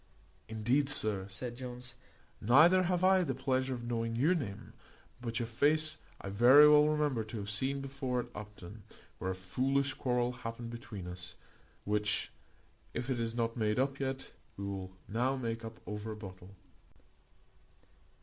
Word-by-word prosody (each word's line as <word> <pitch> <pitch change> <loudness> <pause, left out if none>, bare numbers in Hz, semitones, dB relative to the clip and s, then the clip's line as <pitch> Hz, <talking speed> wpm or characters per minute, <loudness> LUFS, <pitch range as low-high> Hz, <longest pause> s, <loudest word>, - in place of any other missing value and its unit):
"Indeed, 120 +6 +1
sir," 105 -8 +2
said 120 +4 -5
Jones, 125 -1 -7 0.5
"neither 160 - +6
have 180 0 0
I 190 0 +6
the 135 -8 -1
pleasure 130 0 0
of 120 - -7
knowing 115 -1 -2
your 145 +10 +3
name, 110 - -5 0.5
but 115 -2 -3
your 120 - 0
face 155 +7 +1 0.2
I 100 - -6
very 125 +9 +8
well 150 0 +7
remember 150 -6 +1
to 110 +1 -7
have 105 0 -4
seen 135 +6 -1
before 135 -2 -2
at 120 - -10
Upton, 105 -1 -9 0.4
where 95 - -2
a 95 - -1
foolish 135 +9 0
quarrel 125 -1 0
happened 115 -1 -6
between 115 -5 -7
us, 90 0 -8 0.5
which, 105 0 0 0.6
if 120 +3 -2
it 125 - 0
is 115 0 -2
not 115 -1 -1
made 105 -3 0
up 135 +1 0
yet, 135 -1 -3 0.3
we 100 - -4
will 95 -1 -5 0.2
now 125 +5 0
make 115 -3 -3
up 115 0 -8
over 105 +1 -5
a - - -9
bottle." 95 -3 -10
120 Hz, 160 wpm, -33 LUFS, 105-135 Hz, 0.6 s, very